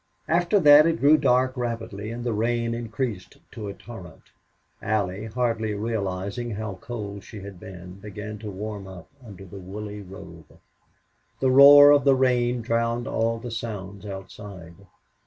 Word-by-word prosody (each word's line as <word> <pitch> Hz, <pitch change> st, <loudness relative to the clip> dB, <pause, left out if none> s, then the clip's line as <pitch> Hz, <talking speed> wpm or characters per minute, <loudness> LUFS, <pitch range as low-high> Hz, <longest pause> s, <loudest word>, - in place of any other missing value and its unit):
After 175 Hz, +4 st, +2 dB
that 150 Hz, 0 st, +8 dB
it 165 Hz, 0 st, 0 dB
grew 145 Hz, +3 st, +6 dB
dark 130 Hz, -3 st, +2 dB
rapidly, 115 Hz, -4 st, -4 dB
and 120 Hz, +1 st, -6 dB
the 120 Hz, -2 st, -1 dB
rain 115 Hz, +2 st, -1 dB
increased 115 Hz, -3 st, -5 dB
to 105 Hz, -2 st, -7 dB
a 100 Hz, -, -6 dB
torrent. 95 Hz, -9 st, -12 dB, 0.5 s
Allie, 105 Hz, -2 st, -2 dB
hardly 110 Hz, -2 st, -1 dB
realizing 100 Hz, +1 st, -3 dB
how 105 Hz, -3 st, -6 dB
cold 100 Hz, -4 st, -7 dB
she 105 Hz, -4 st, -10 dB
had 100 Hz, -2 st, -10 dB
been, 90 Hz, 0 st, -11 dB
began 105 Hz, +1 st, -8 dB
to 110 Hz, -1 st, -7 dB
warm 100 Hz, 0 st, -6 dB
up 95 Hz, -3 st, -12 dB
under 100 Hz, -4 st, -11 dB
the 95 Hz, +2 st, -10 dB
woolly 105 Hz, +2 st, -7 dB
robe. 95 Hz, 0 st, -13 dB, 0.8 s
The 130 Hz, -1 st, +2 dB
roar 145 Hz, +2 st, +9 dB
of 145 Hz, -2 st, +5 dB
the 135 Hz, 0 st, +5 dB
rain 125 Hz, -2 st, +1 dB
drowned 115 Hz, +1 st, -1 dB
all 115 Hz, +1 st, 0 dB
other 120 Hz, +1 st, -7 dB
sounds 100 Hz, -4 st, -6 dB
outside. 95 Hz, -3 st, -9 dB
110 Hz, 155 wpm, -24 LUFS, 100-120 Hz, 0.8 s, roar